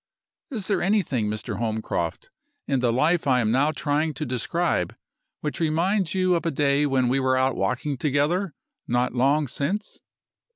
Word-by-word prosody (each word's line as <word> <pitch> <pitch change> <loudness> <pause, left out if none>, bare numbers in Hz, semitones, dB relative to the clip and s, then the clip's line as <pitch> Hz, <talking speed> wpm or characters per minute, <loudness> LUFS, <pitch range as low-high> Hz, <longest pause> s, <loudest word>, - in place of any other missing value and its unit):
"Is 220 -8 -4
there 205 - 0
anything, 175 - +1
Mr. 105 0 -4
Holmcroft, 115 - -3 0.4
in 135 -2 +1
the 125 -2 +2
life 150 +6 +2
I 130 -2 +4
am 110 -2 +1
now 135 +5 +3
trying 150 +1 -1
to 150 - -3
describe 125 - -1 0.5
which 150 - -3
reminds 175 +4 +1
you 185 -1 +3
of 170 - 0
a 170 - 0
day 145 -1 +2
when 130 -2 +2
we 130 +3 +2
were 130 -1 +2
out 130 0 +2
walking 125 +8 -1
together 150 +6 0 0.3
not 120 +1 +1
long 140 +4 +2
since? 165 - -3
145 Hz, 165 wpm, -25 LUFS, 125-170 Hz, 0.5 s, I